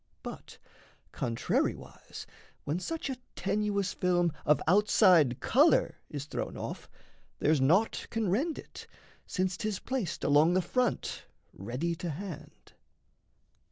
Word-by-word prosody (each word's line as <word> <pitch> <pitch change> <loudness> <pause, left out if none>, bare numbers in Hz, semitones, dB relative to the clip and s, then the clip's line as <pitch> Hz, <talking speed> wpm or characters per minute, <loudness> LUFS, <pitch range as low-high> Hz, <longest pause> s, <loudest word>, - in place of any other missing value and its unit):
But - - -9 0.5
contrariwise, 115 -1 -3 0.4
when 155 +5 -2
such 325 - -4
a 265 -2 -3 0.2
tenuous 200 -1 -1
film 175 -2 +1 0.2
Of 150 - +5
outside 180 - +5
colour 290 +7 +3
is 145 -2 -5
thrown - - -4
off, - - -6 0.5
there's 150 -2 +2
naught 185 +12 +2
Can 225 -2 -1
rend 280 - 0
it, - - -10 0.4
since 185 -1 -1
'tis 210 -1 -2
placed 250 - -3
along 150 +5 +4
the 185 - +3
front 250 +4 -1 0.3
Ready 125 - -3
to 170 +1 -4
hand. 170 +1 -8
180 Hz, 120 wpm, -30 LUFS, 155-210 Hz, 0.5 s, Of